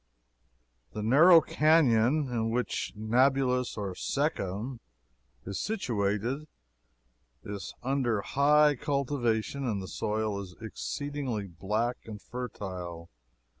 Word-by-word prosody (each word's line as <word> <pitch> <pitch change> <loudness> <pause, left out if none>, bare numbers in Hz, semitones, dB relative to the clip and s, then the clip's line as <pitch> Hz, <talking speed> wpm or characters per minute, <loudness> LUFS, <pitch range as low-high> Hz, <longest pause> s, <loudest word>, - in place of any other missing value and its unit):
The 105 - -4
narrow 160 +9 +7
canon 150 -3 +3
in 115 -2 -1
which 120 +2 -1
Nablous, 125 +3 +2
or 100 -3 -3
Shechem, 120 - -2 0.7
is 95 -2 -4
situated, 120 - -1 1.0
is 100 -3 -6
under 125 -5 0
high 150 +4 +4
cultivation, 140 -3 -1
and 110 -6 -1
the 95 - -6
soil 105 -1 -2
is 90 -3 -10
exceedingly 130 0 -4
black 105 +7 -2
and 105 -2 -8
fertile. 90 -9 -7
120 Hz, 95 wpm, -29 LUFS, 105-140 Hz, 1.0 s, narrow